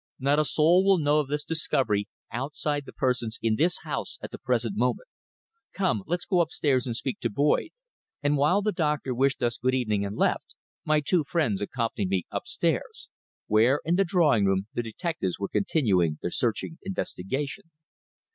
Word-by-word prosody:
Not 140 +2 +2
a 155 - +3
soul 165 +6 +4
will 195 -1 +5
know 150 -1 +3
of 150 - -1
this 150 +1 -2
discovery 130 -10 0 0.2
outside 145 +3 -2
the - - -8
persons 125 -4 -1
in 110 -1 +1
this 165 +8 +1
house - - -4
at - - -6
the - - -8
present 115 -4 0
moment. 125 - 0 0.7
Come, 130 - 0
let's 175 +1 -2
go 180 -3 +3
upstairs 145 -6 0
and 115 -2 -2
speak 130 - -3
to 120 - -1
Boyd," 145 - +1 0.5
and 145 0 +3
while 150 +8 +3
the 215 - +1
doctor 150 -7 -1
wished 135 +3 +1
us 120 0 0
good 130 +2 +1
evening 110 -5 0
and 100 +1 -4
left, - - 0 0.3
my 155 0 +3
two 165 +3 +2
friends 140 - 0
accompanied 115 -3 -2
me 95 -2 0
upstairs, 170 - -2 0.4
where 115 +7 +4
in 170 +3 +2
the 195 - +4
drawing 160 - +3
room 95 0 +1
the - - -1
detectives 115 - -3
were 100 - -3
continuing 95 - +1
their 90 - -2
searching 125 +7 -2
investigation. 145 - -4
135 Hz, 175 wpm, -27 LUFS, 115-160 Hz, 0.7 s, will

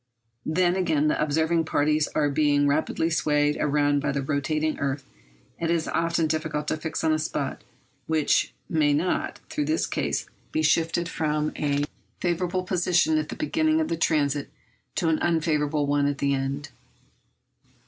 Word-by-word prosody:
Then 175 +2 +2
again, 160 -5 +2
the - - 0
observing 160 +2 +1
parties 150 0 +2
are 150 - +3
being 145 -1 +3
rapidly 155 +3 0
swayed 150 -2 +2
round 145 -1 +2
by 145 0 0
the 140 0 -2
rotating 155 +2 -1
earth 140 0 -2 0.5
and 165 - -1
it - - +3
is 165 -1 -2
often 165 0 +1
difficult 155 -1 -2
to 155 - 0
fix 160 +1 -4
on 160 -1 +3
a 155 - +1
spot 145 -3 -3 0.4
which 155 -2 +2 0.2
may 150 -3 +2
not, 175 +5 -1
through 295 - -1
this 315 +1 +1
cause, - - -2 0.2
be 155 - 0
shifted 165 +2 +2
from 155 -1 -1
a 145 -1 0 0.4
favourable 180 +1 -1
position 175 -3 +2
at 155 - -4
the - - -5
beginning 315 0 +1
of 315 - 0
the - - 0
transit 145 -3 +1 0.5
to 170 - 0
an 160 -1 +2
unfavourable 150 -3 +1
one 145 0 +2
at 145 -1 -1
the 140 0 +1
end. 140 +2 -3
155 Hz, 165 wpm, -25 LUFS, 145-165 Hz, 0.5 s, are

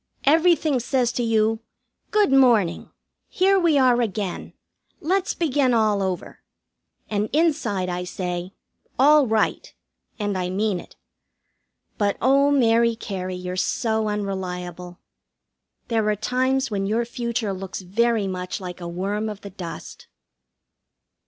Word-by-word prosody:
Everything 315 -2 +3
says 245 0 0
to 245 - -2
you: 225 -1 +1 0.5
"Good 420 -5 +2
morning! 240 -10 +3 0.4
Here 385 +1 +3
we 335 -5 +3
are 250 -2 +4
again. 205 -4 -3 0.5
Let's 375 +4 0
begin 280 -6 +1
all 215 -3 +2
over." 185 -2 -4 0.7
And 210 0 -1
inside 285 - +1
I 180 0 -3
say, 180 0 -4 0.5
"All 290 +1 +5
right," 220 -1 0 0.5
and 205 -2 -2
I 180 0 -2
mean 195 0 0
it; - - -14 1.0
but 205 -1 +1
oh, 275 +3 +4
Mary 235 -4 +3
Cary, 185 -4 -5
you're 180 0 -5
so 220 +3 0
unreliable. 180 -3 -4 0.9
There 225 -3 +1
are 210 - +2
times 260 +4 0
when 195 -1 -1
your 225 +3 0
future 235 -3 -3
looks 190 0 -6
very 220 +3 +1
much 180 -1 -4
like 180 -2 -8
a 170 - -5
worm 200 +5 -2
of 210 -1 -8
the 200 - -9
dust. 175 -3 -9
215 Hz, 130 wpm, -23 LUFS, 190-255 Hz, 1.0 s, All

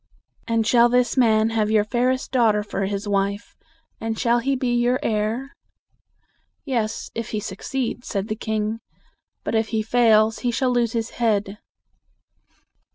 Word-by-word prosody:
"And 230 -2 +1
shall 240 +1 +5
this 245 -1 +2
man 225 -3 +3
have 215 -2 0
your 215 -1 +3
fairest 250 +4 -1
daughter 220 -5 +3
for 195 -2 -3
his 200 +1 -4
wife, 200 +2 -1 0.4
and 225 0 -3
shall 240 +1 +2
he 270 +3 0
be 255 -2 -1
your 240 +2 +2
heir?" 220 +5 -1 1.1
"Yes, 235 -6 -2
if 230 0 -5
he 215 - -2
suc 195 -1 -7
ceeds," 255 -2 -3
said 200 0 -3
the 215 - -2
king. 220 0 -2 0.6
"But - - -3
if 220 -1 +1
he 220 -1 -1
fails, 220 -1 +3
he 245 - -1
shall 250 +2 0
lose 240 -2 +1
his 230 -1 -2
head." 210 -3 -1
225 Hz, 160 wpm, -23 LUFS, 215-240 Hz, 1.1 s, shall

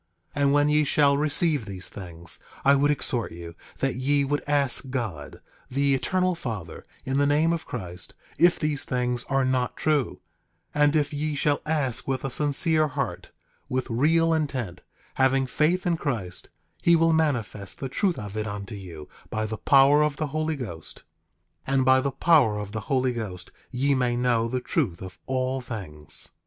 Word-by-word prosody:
10:4 145 - -1
And 140 0 +4
when 145 +1 +3
ye 150 +1 +3
shall 140 0 +3
receive 150 -2 +3
these 95 -2 -6
things, 85 -4 -6 0.3
I 140 - +7
would 140 +1 +3
exhort 125 -7 -1
you 85 0 -9 0.3
that 135 -1 +1
ye 140 +3 +1
would 145 +2 -1
ask 140 -2 0
God, 110 - -5 0.3
the 140 +1 +1
Eternal 185 +7 +1
Father, 110 - -6 0.2
in 135 +1 -1
the 145 0 +3
name 155 +3 +3
of 165 - -5
Christ, 90 -6 -7 0.2
if 175 +1 +5
these 150 -2 -1
things 125 -1 -1
are 135 -1 +1
not 130 -1 0
true; 150 -5 0 0.5
and 145 +1 +3
if 150 -1 +1
ye 150 +1 -2
shall 145 0 +1
ask 145 -6 -1
with 135 0 -2
a 135 - -2
sincere 155 +3 +4
heart, 140 -4 -4 0.4
with 130 -1 -2
real 165 +7 +3
intent, 130 - -2 0.4
having 135 0 +3
faith 155 +7 +1
in 175 -2 +1
Christ, 95 - -4 0.3
he 170 - +5
will 165 0 +3
manifest 120 - -1
the 135 - -3
truth 175 +7 0
of 105 -1 -7
it 110 0 -2
unto 100 +1 -6
you, 85 -7 -9 0.2
by 110 0 -2
the 110 0 -4
power 140 +6 +5
of 150 -1 0
the 155 0 -3
Holy 155 0 -1
Ghost. 85 - -8 0.6
10:5 135 - -1
And 130 -1 +3
by 130 0 +5
the 140 - 0
power 135 -8 +3
of 105 -1 -5
the 110 - -3
Holy 130 -2 +1
Ghost 95 -6 -6 0.2
ye 135 +3 +1
may 125 -2 +1
know 120 -2 +1
the 125 +2 -2
truth 120 - -1
of 95 -1 -10
all 130 0 -1
things. 90 - -4
135 Hz, 180 wpm, -25 LUFS, 110-150 Hz, 0.6 s, I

